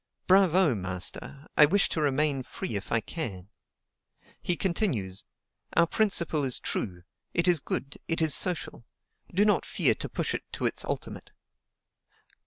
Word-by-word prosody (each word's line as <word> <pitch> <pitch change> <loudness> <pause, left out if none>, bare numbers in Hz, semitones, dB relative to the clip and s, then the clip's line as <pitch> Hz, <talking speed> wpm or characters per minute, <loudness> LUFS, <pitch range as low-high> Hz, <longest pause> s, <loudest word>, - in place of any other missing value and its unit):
Bravo! 185 -4 +5
master; 95 +8 -4
I 150 - +8
wish 200 +5 +3
to 160 - -2
remain 145 -1 +1
free 120 -2 -5
if 100 - -5
I 115 - +3
can. 100 - -6 0.9
He 175 - +1
continues: 145 - -1 0.5
"Our 170 - +5
principle 170 -6 +2
is 130 -2 +1
true; 90 -4 -4 0.3
it 170 +1 +2
is 175 -3 +4
good, 140 0 -4
it 165 - -1
is 160 -3 +3
social. 175 -8 -2 0.5
Do 200 +4 +3
not 210 - +3
fear - - +3
to - - -6
push - - -2
it - - -2
to - - -3
its - - 0
ultimate. - - -5
150 Hz, 150 wpm, -28 LUFS, 115-175 Hz, 0.9 s, I